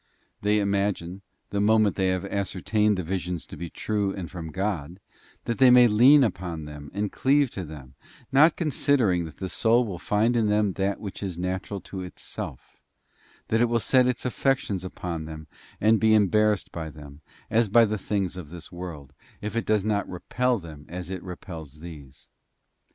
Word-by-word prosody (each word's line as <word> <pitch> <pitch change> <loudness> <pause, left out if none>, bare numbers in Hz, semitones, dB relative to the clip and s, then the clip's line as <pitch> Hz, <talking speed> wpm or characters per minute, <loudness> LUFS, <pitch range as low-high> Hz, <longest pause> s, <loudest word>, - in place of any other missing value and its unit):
They 105 +1 +2
imagine, 100 -2 -1 0.3
the 100 - 0
moment 110 -2 +4
they 95 - +1
have 95 0 0
ascer 100 -1 -3
tained 105 -1 +2
the 90 - -3
visions 90 -1 -3
to - - -10
be 85 -1 -6
true 105 +1 -1
and 90 -4 -6
from 80 -3 -6
God, 95 -3 -3 0.5
that 115 -2 -2
they 130 -1 +8
may 125 0 +8
lean 130 +7 +7
upon 90 -7 -3
them 75 -1 -9
and 100 +1 -2
cleave 140 -1 +2
to 95 - -5
them; 75 -5 -10 0.4
not 150 +5 +6
considering 130 - +1
that 80 - -10
the 95 - -4
soul 120 +3 +2
will 95 -6 -5
find 110 +6 +1
in 115 -2 +2
them 105 -1 +2
that 100 +1 -1
which 100 -3 -7
is 95 -4 -4
natural 95 +2 -3
to 95 - -7
itself, 90 -1 -8 0.7
that 115 +1 +2
it - - +6
will 115 0 +2
set 125 +2 +4
its 125 0 -2
affections 125 -7 0
upon 85 -3 -5
them 80 0 -8 0.3
and 110 +1 +4
be 110 -1 +5
embarrassed 105 0 +2
by 80 -2 -5
them, 75 -1 -12 0.3
as 115 -1 +3
by 115 +3 +6
the 105 -1 -2
things 95 -3 -2
of 90 -5 -8
this 85 0 -10
world, 85 -6 -8 0.3
if 105 +2 -5
it 115 - -1
does 105 -2 +2
not 105 -1 0
repel 125 +7 0
them 80 -6 -10
as 90 +1 -6
it 95 -2 -4
repels 85 -5 -9
these. 75 -6 -12
100 Hz, 185 wpm, -26 LUFS, 85-110 Hz, 0.7 s, they